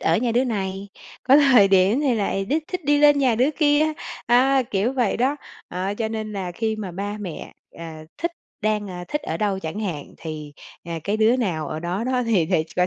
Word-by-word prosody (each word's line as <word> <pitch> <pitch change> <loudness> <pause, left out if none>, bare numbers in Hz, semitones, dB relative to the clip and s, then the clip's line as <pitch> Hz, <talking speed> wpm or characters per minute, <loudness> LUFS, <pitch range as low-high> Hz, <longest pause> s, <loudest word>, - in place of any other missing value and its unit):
ở - - +2
nhà 235 0 0
đứa 245 +2 +3
này, 195 -4 -3 0.3
có 270 +2 +6
thời 255 -9 +6
điểm 195 +6 +4
thì 270 -5 +2
lại 195 -2 -1
đích 305 +8 -1
thích 365 -4 -4
đi 290 +1 +3
lên 290 -1 +6
nhà 255 -4 +3
đứa 255 +6 +2
kia, 295 -1 +4 0.4
à, 260 +3 +4
kiểu 210 +6 +1
vậy 245 -6 +1
đó. 265 +4 +1 0.3
Ờ, 185 +3 -3
cho 220 +1 -2
nên 220 -1 -4
là 185 -3 -4
khi 220 +3 -2
mà 205 -4 -5
ba 205 +3 -4
mẹ, 185 -6 -7 0.3
ờ, 170 - -7 0.4
thích 340 - +1 0.3
đang, 210 -2 -1
a, 180 -1 -6
thích 295 - -2
ở 160 - -3
đâu 200 0 0
chẳng 165 +2 -5
hạn, 170 -9 -5
thì, 155 -2 -7 0.3
à, 170 -1 -4
cái 205 +2 0
đứa 220 +3 +4
nào 180 -11 -2
ở 155 - -4
đó 180 +6 -2
đó 255 0 0
thì 195 -8 +2
thì 155 - +1
coi 180 0 +3
215 Hz, 225 wpm, -23 LUFS, 190-255 Hz, 0.4 s, có